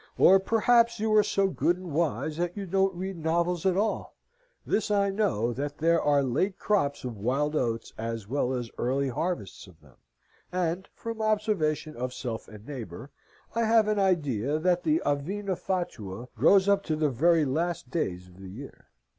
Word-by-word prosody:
Or 195 +1 +7
perhaps 230 +3 +3
you 220 0 +1
are 215 - +7
so 195 -1 +1
good 175 -1 +1
and 180 -2 -8
wise 150 -1 -1
that 175 +2 -2
you 200 - -3
don't 190 +1 +1
read 190 +1 -5
novels 170 +2 0
at 185 -1 +2
all. 215 +2 -1 0.5
This 215 - 0
I 200 -1 +2
know, 120 - 0
that 145 +3 -4
there 165 +1 +3
are 145 -1 +3
late 155 +10 0
crops 145 -9 0
of 120 -5 -6
wild 140 +7 0
oats, 115 -5 -1
as 115 -2 -4
well 130 +1 0
as 120 -3 -4
early 135 +3 0
harvests 160 - -4
of 85 -3 -18
them; 70 -4 -22 0.5
and 180 +1 -2
(from 230 -1 -5
observation 205 -8 0
of 125 +1 -4
self 115 -4 -5
and 105 0 -13
neighbour) 125 - -7 0.4
I 230 0 +1
have 220 -1 +4
an 210 -1 +1
idea 145 - +1
that 175 +2 +1
the 310 - +1
avena 190 +7 -1
fatua 125 - -4
grows 190 - +5
up 200 -1 +4
to 155 - 0
the 155 -2 +1
very 160 +5 +3
last 160 -1 -2
days 90 - -2
of 90 0 -18
the 95 -1 -9
year. 130 +9 -11
160 Hz, 180 wpm, -28 LUFS, 125-195 Hz, 0.5 s, Or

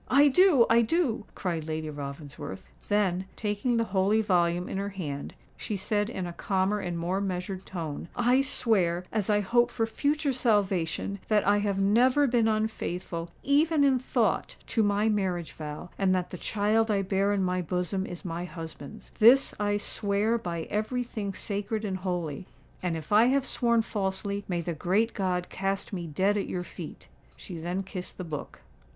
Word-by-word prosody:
"I 285 +3 +6
do—I 270 -8 +5
do!" 235 -4 0
cried 165 -4 -3
Lady 155 0 -3
Ravensworth: 140 - -7 0.2
then, 190 -3 +1
taking 215 +3 0
the 230 - +3
holy 195 +3 +3
volume 175 -2 +2
in 195 - -3
her 200 +1 -2
hand, 150 -8 -5 0.2
she 210 - -4
said 205 +2 0
in 190 -6 -4
a 175 - -5
calmer 190 +3 0
and 175 -3 -3
more 180 +4 -1
measured 185 0 -4
tone, 165 -4 -5
"I 245 +2 +4
swear, 185 -10 +1
as 215 -3 -1
I 210 0 +3
hope 240 +4 +3
for 225 -2 0
future 285 +5 0
salvation, 200 -6 0
that 210 -2 +3
I 205 +1 +4
have 205 -1 0
never 245 +8 +4
been 235 -4 +3
unfaithful, 185 -6 -2
even 295 +2 +3
in 270 -2 +4
thought, 255 - 0 0.2
to 225 - +3
my 205 +1 +2
marriage 190 -6 0
vow, 150 +2 -7
and 190 -1 +3
that 180 -1 -2
the 180 - -5
child 220 +2 +1
I 200 -2 +2
bear 195 +1 +1
in 200 -2 +1
my 180 0 0
bosom 180 +2 -2
is 175 +2 -8
my 170 0 -3
husband's. 160 -5 -9
This 240 +5 +7
I 205 0 +1
swear 205 +2 0
by 170 -4 -3
every 220 +4 0
thing 205 -5 -5
sacred 210 +1 -3
and 190 -2 -2
holy; 180 -3 -3 0.3
and 175 -3 -1
if 155 +3 -9
I 215 +3 +7
have 270 +2 +2
sworn 235 -2 +2
falsely, 200 -1 -2
may 175 -2 -1
the 170 0 -3
great 190 +8 +1
God 180 -2 -1
cast 195 +1 -2
me 175 -3 -3
dead 190 +7 +1
at 200 - -1
your 180 - -2
feet." 175 - -9 0.3
She 175 -5 -8
then 175 +4 -2
kissed 185 -1 -7
the 185 - -4
book. 155 -4 -7
200 Hz, 180 wpm, -28 LUFS, 180-220 Hz, 0.3 s, This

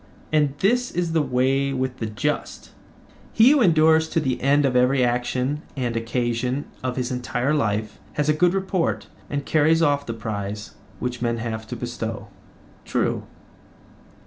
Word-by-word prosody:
And 145 -3 +2
this 245 +5 +2
is 175 -1 -2
the 160 -1 +2
way 135 +1 +1
with 130 -1 -2
the 110 - -3
just; 105 -1 -3 0.6
he 230 +4 +7
who 295 -2 +4
endures 160 -4 +4
to - - +1
the 130 -5 -1
end 140 +2 +3
of 130 -2 +1
every 125 +1 +4
action 125 +4 -1 0.2
and 120 -3 -1
occasion 120 +3 -1 0.2
of 130 -1 -2
his 125 -1 -2
entire 125 +2 -1
life 110 -6 -1
has 150 0 -1
a 150 - +4
good 175 +4 +3
report 170 - -1 0.2
and 145 -1 -3
carries 160 +1 +3
off 145 -2 +1
the 115 - -3
prize 105 -2 -5 0.2
which 125 -1 -4
men 115 -1 0
have 110 -1 -4
to 120 - -5
bestow. 115 -3 -5 0.5
True. - - -1
130 Hz, 160 wpm, -23 LUFS, 120-155 Hz, 0.6 s, he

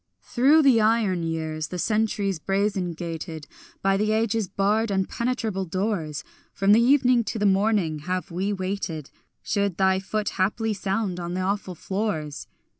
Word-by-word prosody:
Through 285 +6 +4
the 255 -5 +5
iron 215 -5 +2
years, 160 -1 -3
the 180 - -6
centuries 205 -2 0
brazen 195 -1 0
gated, 165 -2 -6 0.4
By 195 0 +3
the 215 +1 +1
ages' 220 -1 0
barred 210 +4 +1
impenetrable 205 +1 -1
doors, 180 -4 -2 0.3
From 195 +1 +2
the 220 +3 +6
evening 250 -1 +4
to 225 - -3
the 210 - 0
morning 195 -5 +2
have 185 +4 -3
we 190 +4 -1
waited, 185 -6 -4 0.3
Should 200 -4 -1
thy 190 -1 +3
foot 210 +2 -2
haply 215 +4 0
sound 195 -2 -2
on 175 0 -4
the 185 - -1
awful 195 -1 -2
floors. 170 -6 -3
195 Hz, 150 wpm, -25 LUFS, 180-215 Hz, 0.4 s, the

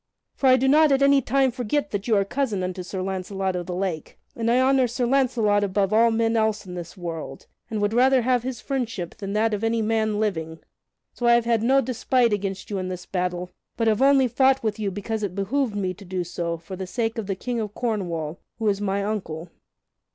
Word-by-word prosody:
For 270 - 0
I 255 - +7
do 265 +1 +1
not 300 +2 +5
at 275 0 +3
any 280 0 +5
time 265 +2 +2
forget 255 +4 -2
that 205 +1 -3
you 225 - +3
are 200 -1 +2
cousin 220 -4 -1
unto 185 0 -3
Sir 185 +1 -5
Launcelot 190 0 -2
of 175 -1 -4
the 180 - -3
Lake, 180 -5 -3 0.2
and 230 0 -1
I 245 +2 +4
honor 260 -1 +4
Sir 245 +1 -1
Launcelot 235 -6 +2
above 195 0 0
all 230 +2 +5
men 225 0 +1
else 220 -2 +1
in 180 - -8
the 175 -2 -6
world, 170 -3 -6 0.2
and 220 - -2
would 205 +1 +1
rather 255 +1 +4
have 250 0 +2
his 250 -2 -5
friendship 230 - -3
than 200 -1 -5
that 220 +1 +1
of 210 +1 -2
any 225 0 +1
man 220 -1 0
living. 160 -7 -2 0.6
So 240 - -1
I 235 - +7
have 235 -1 +3
had 230 -2 +2
no 265 +4 +4
despite 250 -2 +1
against 195 0 -3
you 200 - -1
in 185 - -3
this 180 -1 -6
battle, 180 -1 -3 0.3
but 230 -1 +1
have 215 +2 +2
only 270 -1 +5
fought 265 +2 +3
with 215 -1 -1
you 205 -2 -1
because 205 +3 -4
it 195 -4 -3
behooved 220 +4 -1
me 190 -3 -1
to 200 - -14
do 185 -1 -3
so 170 -1 -3
for 165 +3 -9
the 190 0 -6
sake 225 +3 -2
of 210 - -5
the 195 - -1
King 240 +4 -3
of 210 -2 -4
Cornwall, 175 -9 -2 0.2
who 225 -1 -1
is 200 0 -1
my 200 0 0
uncle." 180 -6 -4
215 Hz, 230 wpm, -24 LUFS, 190-245 Hz, 0.6 s, I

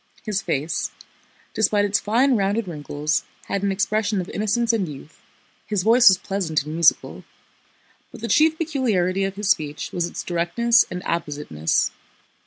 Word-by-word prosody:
His 210 -2 -2
face, 160 -3 -2 0.6
despite 210 -2 +2
its 205 0 +1
fine, 250 +5 +2
rounded 200 +1 0
wrinkles, 150 -1 -2 0.2
had 200 - -2
an 200 0 0
expression 210 +1 0
of 180 - -5
innocence 220 +3 0
and 205 -5 0
youth, 145 +2 -12 0.5
his 205 -4 -1
voice 235 +3 +5
was 190 - +8
pleasant 170 -6 -2
and 150 +1 -7
musical. 165 0 +2 0.9
But 235 - -12
the 230 - -3
chief 315 +5 +3
peculiarity 215 - 0
of 195 0 -4
his 205 0 +1
speech 150 -1 -2
was 175 -1 -1
its - - -6
directness 185 +8 +2
and 180 0 -6
appositeness. 145 - -1
195 Hz, 155 wpm, -22 LUFS, 170-220 Hz, 0.9 s, was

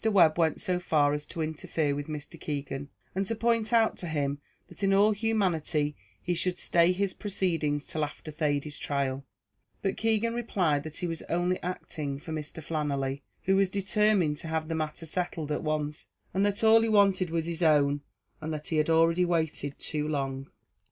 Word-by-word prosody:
Webb 175 -7 +5
went 160 -1 +2
so 180 -4 0
far 150 -4 +2
as 150 0 -3
to 165 - -3
interfere 155 -1 -1
with 145 0 -4
Mr. 150 -2 -7
Keegan, 140 -1 -4 0.2
and 195 - 0
to 225 - -1
point 230 0 +1
out 225 -2 +3
to 175 - -3
him 145 -3 -1 0.3
that - - -10
in 195 0 +3
all 205 +2 +5
humanity 180 -9 0 0.2
he 175 - -1
should 180 +1 -1
stay 170 +1 +3
his 190 +1 0
proceedings 165 -8 -1
till 155 - -2
after 150 +1 -6
Thady's 150 -1 -1
trial, 140 -1 -1 0.6
but 195 - 0
Keegan 225 +1 +1
replied 185 -11 +1
that 155 -1 -5
he - - -1
was 165 -2 -3
only 175 +2 +1
acting 155 -5 -4
for 155 +3 -9
Mr. 155 +1 -6
Flannelly, 140 -3 -2 0.2
who 190 - +3
was 195 -1 +3
determined 200 -4 +2
to 165 - -5
have 160 0 -2
the - - -1
matter 155 +1 -3
settled 165 -2 -2
at 150 - -1
once; 150 -1 -2 0.2
that 200 +3 +1
all 225 0 +7
he 225 - +1
wanted 195 -4 +4
was 165 -1 -1
his 170 0 -4
own, 145 -3 +4 0.4
and 155 +1 -3
that 150 -1 -4
he 160 - 0
had 155 +1 +2
already 165 +2 +4
waited 160 -5 -1
too 150 -1 -3
long. 135 -2 -2
160 Hz, 185 wpm, -29 LUFS, 150-190 Hz, 0.6 s, all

